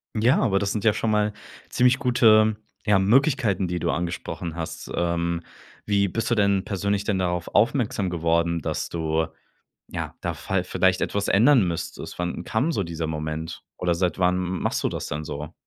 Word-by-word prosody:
Ja, 115 +5 +3
aber 100 -6 +2
das 100 -1 -1
sind 105 - -2
ja 110 -2 +4
schon 115 - -1
mal 105 -1 +1 0.4
ziemlich 125 +1 +3
gute, 110 -5 +4 0.3
ja, 105 -2 +4
Möglichkeiten, 115 - +2
die 90 0 -2
du - - -1
angesprochen 85 -1 -3
hast. 80 -1 -6
Ähm, 85 0 0 0.4
wie 100 -1 +2
bist 115 +4 -2
du 120 - +2
denn 100 -2 +2
persönlich 100 0 -1
denn 100 -2 0
darauf 90 -2 -1
aufmerksam 105 -4 +2
geworden, 85 0 +1
dass - - -3
du 80 -1 0 0.6
ja, - - -5
da - - -2
fall 95 -1 -2
vielleicht 95 0 +1
etwas 100 0 -1
ändern 115 -1 +5
müsstest? 85 -1 -5
Wann 90 0 -3
kam 125 +11 0
so 100 - -1
dieser 85 -1 -4
Moment? 80 +1 -4
Oder 90 -1 +1
seit 90 0 -1
wann 90 0 +3
m 90 0 -2
machst - - 0
du - - +2
das - - -5
denn 75 +1 -4
so? 75 +2 -6
95 Hz, 185 wpm, -24 LUFS, 85-110 Hz, 0.6 s, ändern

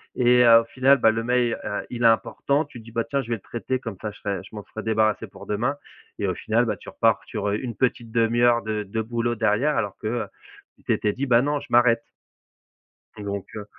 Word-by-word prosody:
et 125 0 +5
heu, 115 -1 +8
au - - -9
final, 130 +4 +3
bah, 110 - +4
le 115 0 -2
mail, 120 -1 +1
heu, 105 - -3
il 120 -1 -5
est - - +4
important, 140 +6 +1
tu 120 - -12
te - - -14
dis: 115 - -13
«Bah, 115 0 -1
tiens, 140 +4 -1
je 120 - -11
vais 115 - +1
le 110 - -12
traiter, 120 +5 -3
comme 115 -5 -6
ça, 110 - -3
je 105 - -15
serai 100 -2 -2
je - - -14
m'en 105 - -6
serai 110 - -4
débarrassé 110 -1 +1
pour - - -13
demain» 120 +7 -1 0.4
et 100 - -1
au 95 - 0
final, 115 +6 0
bah, 115 - -2
tu - - -11
repars - - +2
sur, 100 - -3
heu, 105 - 0
une 120 -4 -5
petite 120 -2 -1
demi-heure 120 +1 +3
de 110 -1 -2
de 105 +3 -3
boulot 120 +1 -1
derrière 115 +7 +1
alors 100 -3 -1
que, - - -4
heu, 115 +1 -1 0.5
tu - - -26
t'étais 105 - +1
dit: 140 - -2
«Bah, 120 -1 +5
non, 145 0 0
je 140 - -12
m'arrête». 120 -1 +4 1.2
Donc, 100 -1 -4
heu 105 - -6
115 Hz, 250 wpm, -24 LUFS, 110-120 Hz, 1.2 s, heu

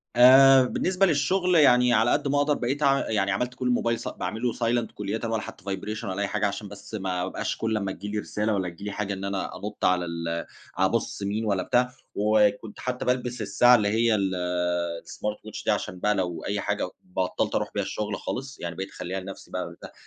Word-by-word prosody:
آآ، 130 +2 +8
بالنسبة 185 +8 +1
للشغل 180 +3 +2
يعني 125 -5 +6
على - - +4
قد 145 0 +1
ما 145 - +1
أقدَر 145 +1 +3
بقيت 140 +3 -2
اع 140 -1 +3
يعني 100 -2 +1
عملت 125 +5 -1
كل 125 0 -2
الموبايل 115 -1 +1
س - - -6
باعمله 115 +2 -2
silent 120 0 0
كُلّيةً 105 +2 -3
ولا 115 -2 -1
حتى 95 - -10
vibration 100 +2 -4
ولا 95 +1 -3
أي 100 - 0
حاجة، 105 0 0
عشان 100 +1 -5
بس 100 +2 -12
ما 95 -3 -2
أبقاش - - -3
كل 110 -1 0
ما 100 -1 -2
تيجي 105 +2 -6
لي 105 - 0
رسالة 105 +1 -1
والّا 95 -3 -1
تيجي 85 +4 -12
لي 105 - -3
حاجة 100 -1 -3
إن 95 0 -5
أنا 100 -1 -3
أنُطّ 105 +1 -4
على 90 -1 +3
ال 85 0 -3 0.3
أبُص 95 +2 0
مين 105 +3 -1
والّا 100 -3 +1
بتاع. 125 +1 +2 0.2
وكنت 105 0 +2
حتى 125 0 -3
بالبس 125 0 -1
الساعة 125 0 +5
اللي 105 -3 +2
هي 110 +2 +3
ال 100 -2 0 0.7
الsmart 105 0 -4
watch - - -7
دي - - +3
عشان 90 - -2
بقى 105 +2 +2
لو 90 -3 -2
أي 100 +1 -1
حاجة، - - -1
و - - -13
بطَّلت 90 0 -2
أرُوح - - 0
بيها - - 0
الشغل 105 -1 -3
خالص، 135 +1 -5
يعني 85 -1 -5
بقيت 95 +2 -5
اخلِّيها 95 +2 -5
لنفسي 95 +1 -10
بقى - - -3
وده - - -11
105 Hz, 220 wpm, -26 LUFS, 100-125 Hz, 0.7 s, آآ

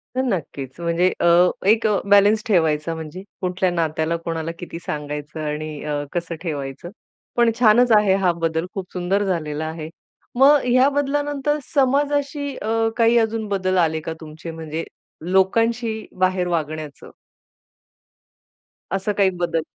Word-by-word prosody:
तर 260 - +1
नक्कीच, 155 - -4
म्हणजे 170 +2 +2
अ, - - +1 0.4
एक 220 +2 +4 0.2
बॅलन्स 205 +2 +5
ठेवायचा 160 -4 +2
म्हणजे, 160 +3 -7 0.2
कुठल्या 185 0 0
नात्याला 160 -1 0
कोणाला, 165 -1 -3
किती 170 -1 -7
सांगायचं 150 +1 -5
आणि 150 0 -4
अ, 145 -1 -2
कसं 170 -1 -3
ठेवायचं. 145 -1 -5 0.5
पण 235 -1 +4
छानच 240 +1 +5
आहे 205 -2 +3
हा 180 - +4
बदल 165 0 0
खूप 190 -3 -6
सुंदर 190 +3 0
झालेला 155 -4 -2
आहे. 160 0 -6 0.5
मग 280 +3 +7
ह्या 255 +2 +4
बदलानंतर 290 +1 0 0.2
समाजाशी 285 +1 +1
अ, 225 +1 0
काही 230 0 +4
अजून 225 -1 0
बदल 185 -2 0
आले 160 -2 +2
का 160 - -4
तुमचे 160 +2 -8
म्हणजे, 160 0 -5 0.5
लोकांशी 225 +3 +1
बाहेर 185 -1 +2
वागण्याचं? 155 -3 -4 1.8
असं 195 +2 -1
काही 195 -2 +4
बदल? 165 -2 0
185 Hz, 135 wpm, -21 LUFS, 160-225 Hz, 1.8 s, मग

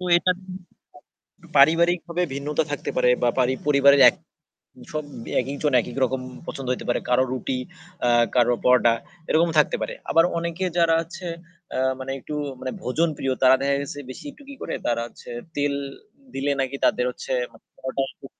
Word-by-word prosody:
তো - - -5
এটা 180 +1 +2
কিন্তু 185 -1 -12 0.8
পারিবারিকভাবে 170 +4 +4
ভিন্নতা 145 +3 -1
থাকতে 145 - -3
পারে 125 -1 +4
বা 120 - +4
পারি 130 0 +3
পরিবারের 140 -1 +6
এক - - +3 0.8
সব 155 0 -2 0.4
একেক 135 +3 -4
জন 150 -2 +2
একেক - - -7
রকম 130 +1 -1 0.3
পছন্দ 135 - -6
হইতে 125 - -5
পারে। 120 - +1
কারো 125 +1 +4
রুটি 130 0 -2 0.5
আ - - +4 0.3
কারো 120 -1 +4
পরোটা 125 -2 +5 0.4
এরকম 165 +2 +4
থাকতে 150 - +4
পারে। - - -3 0.2
আবার 165 - +5
অনেকে 170 +2 -3
যারা 165 -1 +4
আছে 175 +2 -9 0.5
আ - - -1 0.2
মানে 130 0 -6
একটু 150 - -7 0.3
মানে 130 - -4
ভোজনপ্রিয় 145 0 0
তারা 130 0 +7
দেখা 140 0 +2
গেছে 140 0 -6
বেশি - - -9
একটু 285 - -17
কি 280 - -8
করে - - -3
তারা 115 -1 +1
হচ্ছে 120 - -13 0.3
তেল 145 0 +1 0.6
দিলে 135 +2 -1
নাকি 135 +1 -2
তাদের 125 - +2
হচ্ছে 125 - -6 0.5
পরোটা 130 +1 -2
একটু - - -13
140 Hz, 170 wpm, -24 LUFS, 130-165 Hz, 0.8 s, তারা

